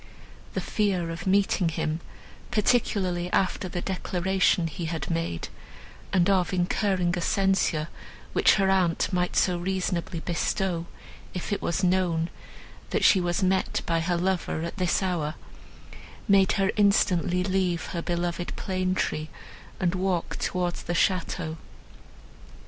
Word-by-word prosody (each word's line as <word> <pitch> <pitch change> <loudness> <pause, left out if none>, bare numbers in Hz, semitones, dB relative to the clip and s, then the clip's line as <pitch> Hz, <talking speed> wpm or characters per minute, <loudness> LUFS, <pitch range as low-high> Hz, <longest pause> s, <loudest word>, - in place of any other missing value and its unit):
The - - 0
fear 190 -6 0
of 165 +3 -6
meeting 195 -2 +3
him, 155 0 -2 0.5
particularly 190 -6 +1
after 185 -1 0
the 175 - -3
declaration 185 -1 +1
he 165 +1 -4
had 160 -1 -3
made, 165 - -2 0.6
and 180 -1 +3
of 190 -2 +2
incurring 180 0 +1
a 175 - -2
censure, 190 -5 +1 0.5
which - - +5
her 195 -2 +2
aunt 185 0 +1
might 180 0 0
so 180 -2 +2
reasonably 180 -1 -2
bestow, 170 +1 -1 0.5
if 180 +3 -3
it - - -2
was 170 +3 -1
known, 175 -2 +1 0.6
that - - 0
she 190 - +6
was 175 +2 0
met 190 +1 +1
by 165 -1 +1
her 175 +1 0
lover, 180 -2 -1
at 170 - -5
this 180 +1 +1
hour, 170 -5 -1 0.9
made 195 -2 +5
her 195 -1 +2
instantly 185 -3 +3
leave 185 -3 0
her 170 - -2
beloved 175 0 -2
plane 185 -1 -1
tree, 155 -3 -1 0.5
and 175 -2 +1
walk 185 -2 -1
towards 180 -1 -1
the 175 - -3
château. 170 -2 0
180 Hz, 135 wpm, -26 LUFS, 170-190 Hz, 0.9 s, she